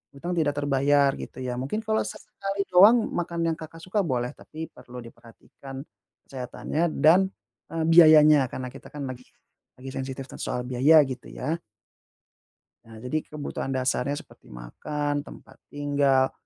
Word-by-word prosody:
utang 170 +6 -5
tidak 155 -4 0
terbayar, 140 0 +3
gitu 130 - -8
ya. 125 -1 -3
Mungkin 215 +12 -3
kalau 220 0 +1
sesekali 195 0 -4
doang 215 +6 +7
makan 170 -1 -2
yang - - -8
Kakak 165 +1 -10
suka 205 +3 0
boleh, 125 -7 -2
tapi 160 +2 -9
perlu 125 0 -11
diperhatikan 120 +3 -12 0.4
kesehatannya 135 +4 -4
dan, 180 +5 +5 0.4
eee, 165 -1 -2
biayanya. 155 -4 +7
Karena 130 0 -6
kita - - -12
kan 145 -2 -6
lagi 125 -1 -7 0.5
lagi 130 +1 -9
sensitif 135 0 -5
kan - - -9
soal 125 0 -3
biaya, 135 +6 +5
gitu, 130 -1 -7
ya. 160 +3 -3 1.3
Nah, 115 0 -13
jadi 125 +5 -1
kebutuhan 145 -2 -5
dasarnya 130 +2 0
seperti - - -21
makan, 145 - -4
tempat 145 - -12
tinggal, 140 -2 +1
145 Hz, 145 wpm, -26 LUFS, 130-160 Hz, 1.3 s, doang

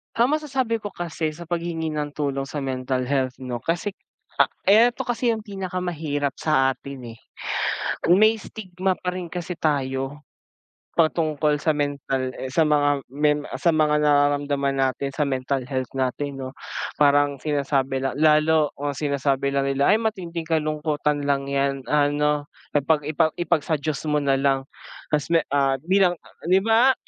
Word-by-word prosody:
Ah, 235 +1 +4
masasabi 270 -5 0
ko 205 - -4
kasi 165 -2 -3
sa 170 +2 -10
paghingi 170 -1 -2
ng 150 -1 -3
tulong 140 -2 -2
sa 145 +2 -5
mental 130 -1 -2
health 130 -1 -1
'no, 125 -2 -5
kasi, 175 +4 -2 0.7
ah, 220 +5 +7
eto 245 - -6
kasi 245 0 +1
yung 225 - 0
pinakamahirap 175 - -3
sa 135 -4 +2
atin, 130 -5 -9
eh, - - -20 0.9
may 215 +6 +5
stigma 190 -3 -3
pa 180 - -3
rin 180 -1 -5
kasi 175 0 -5
tayo. 135 -2 -1 0.7
Patungkol 155 -2 +2
sa 160 - +3
mental, 140 -3 -2
eh, 130 - -5
sa 165 - +3
mga 145 -1 +2
men 150 +1 +1
sa 170 - +3
mga 150 -1 +3
nararamdaman 145 -1 +2
natin 135 +1 0
sa 150 - +1
mental 135 0 -1
health 130 -1 -3
natin, 135 +2 -2
'no. 130 - -6 0.5
Parang 145 -1 +4
sinasabi 140 -2 0
la 135 - 0
lalo 155 0 +4
kung 145 +1 -2
sinasabi 140 -1 0
lang 140 0 0
nila, 140 0 +2
ay - - +3
matinding 175 -7 -3
kalungkutan 150 -2 0
lang 140 -1 0
’yan, 140 -1 0
ano, 150 0 +2 0.3
ipag 150 +2 +2
ipa 155 0 +2
ipag 170 -3 +1
sa 160 - -1
Diyos 150 0 -3
mo 150 - +3
na 140 -1 +2
lang. 135 -1 +1 0.4
Ta's 150 +1 -1
me 165 - +6 0.2
ah, 135 -1 +2
bilang, 185 +2 +3
ah, - - -22
di 190 - +6
ba? 225 +5 +5
150 Hz, 160 wpm, -23 LUFS, 140-170 Hz, 0.9 s, ah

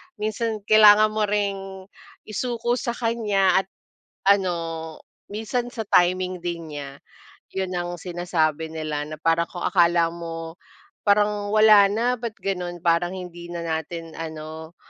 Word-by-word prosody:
minsan 215 0 -3
kailangan 215 0 +7
mo 215 -1 0
ring 195 -2 -2 0.4
isuko 240 +2 -2
sa 235 0 -3
kanya 210 -6 +2
at 195 - -4 0.6
ano, 165 -4 -1 0.4
minsan 225 +3 -2
sa 225 - -3
timing 180 0 +2
din 170 -3 -4
niya." 140 -1 -9 0.6
Yun 190 -1 -2
ang 175 0 -3
sinasabi 165 -3 -1
nila 155 -2 -3
na 155 - -6
parang 165 0 +2
kung 175 - -7
akala 170 -2 +3
mo 165 -1 -7 0.5
parang 205 0 +2
wala 215 -2 +7
na, 235 +4 +1
ba't 230 -3 -4
ganon 180 -2 -3
parang 175 +1 +2
hindi 175 -2 -8
na 170 -1 -5
natin 165 +1 -4
ano, 160 0 -8
180 Hz, 135 wpm, -24 LUFS, 165-210 Hz, 0.6 s, kailangan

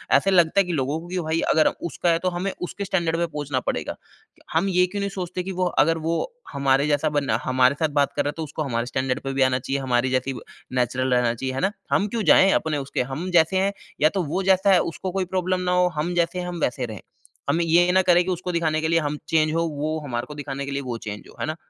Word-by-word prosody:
ऐसे 195 - +3
लगता 175 0 +4
है - - +6
कि 175 - -3
लोगों 145 +1 -1
को 170 - -11
कि 180 +1 -3
भई 160 0 -1
अगर 155 - +4
उसका 170 +1 -2
है 165 - +2
तो 185 - 0
हमें 180 +2 -2
उसके 200 +3 -4
स्टैंडर्ड 170 -4 0
पे 170 - +1
पहुँचना 145 -4 -3
पड़ेगा। - - -3 0.6
हम 195 - +2
ये 180 -1 +4
क्यों 205 +2 -5
नहीं 200 - -1
सोचते 180 -1 -4
कि 190 - -5
वो 185 - +1 0.2
अगर 165 +1 +1
वो 165 +1 -1 0.4
हमारे 140 +1 +2
जैसा 150 +1 +1
बनना 140 -1 +1
हमारे 130 +1 +3
साथ 160 -2 +1
बात 140 - +2
कर - - +2
रहा - - -1
है - - -4
तो 160 - -3
उसको 155 +1 -4
हमारे 120 -4 -2
स्टैंडर्ड 130 0 -1
पे 135 0 -3
भी 135 - 0
आना 130 -1 +2
चाहिए, 135 +2 -2
हमारी 125 -1 +1
जैसे 130 +1 0
ही 125 - -6 0.4
नेचुरल 125 +1 +1
रहना 120 -1 +2
चाहिए, 130 +2 -3
है 135 - -2
ना? 195 - +2 0.2
हम 205 - +2
क्यों 225 +1 -2
जाएँ? 195 - +6
अपने 160 -4 +1
उसके 140 -1 -2
हम 170 +7 -4
जैसे 175 +2 +4
हैं, 195 +1 +1 0.3
या 155 - +6
तो 190 +1 -1
वो 170 +5 -2
जैसा 190 +1 +4
है 180 - +6
उसको 185 +3 -5
कोई 190 0 -1
प्रॉब्लम 185 0 0
ना 180 - 0
हो, 180 0 +4
हम 165 +4 -1
जैसे 170 +1 0
हैं 180 - -4
हम 175 -1 -5
वैसे 125 0 0
रहें। 110 -4 -8 0.5
हम 165 +4 +2
ये 170 +2 +4
ना 190 +1 +4
करें 180 -1 +5
कि 185 - -1
उसको 180 0 -3
दिखाने 160 -2 0
के 160 - 0
लिए 165 0 +3
हम 150 -1 -2
चेंज 155 -1 +2
हों 165 0 0
वो 155 +2 -1
हमारे 120 -3 -3
को 150 - -9
दिखाने 140 -1 -5
के 140 - -5
लिए 140 0 -2
वो 125 -3 -4
चेंज 105 0 -5
हो, - - -16
है - - 0
ना? 155 - -2
160 Hz, 275 wpm, -23 LUFS, 140-180 Hz, 0.6 s, है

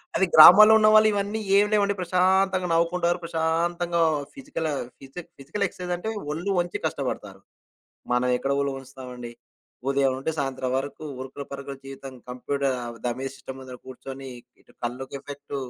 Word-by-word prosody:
అది 190 - +3
గ్రామాల్లో 210 +7 +10
ఉన్న 215 - +5
వాళ్ళు 215 0 +7
ఇవన్నీ 205 +2 -2 0.2
ఏమి 205 +1 +4
లేవడి. 200 -1 +2
ప్రశాంతంగా 185 +1 +2
నవ్వుకుంటారు. 170 +1 +1
ప్రశాంతంగా 170 +1 0 0.3
ఫిజికల్ 165 - -4 0.3
ఫిజి 135 +6 -9 0.2
ఫిజికల్ 165 +9 -3
ఎక్సర్సైజ్ 180 -1 -5
అంటే. 220 +5 -5 0.2
ఒళ్ళు 170 +6 -3
వంచి 175 0 -3
కష్టపడతారు. - - -4 0.7
మనం 125 +1 +1
ఎక్కడ 135 - -2
ఒళ్ళు 140 0 -1
వంచుతామండి? 125 -3 -9 0.6
ఉదయం 140 -1 +2
నుండి 150 +4 -2
సాయంత్రం 130 -2 -2
వరకు. 140 +3 -5 0.2
ఉరుకులు 135 +1 -8
పరుకులు 140 0 -7
జీవితం. 135 -1 -9 0.2
కంప్యూటర్ 135 +1 -2 0.3
దమే 130 +3 -2
సిస్టమ్ 130 +1 -9
ముందుర 130 -1 -10
కూర్చొని. 135 +1 -9 0.3
ఇటు - - -24
కళ్ళుకి 130 +3 -6
ఎఫెక్ట్, 145 0 -8
145 Hz, 140 wpm, -25 LUFS, 135-180 Hz, 0.7 s, గ్రామాల్లో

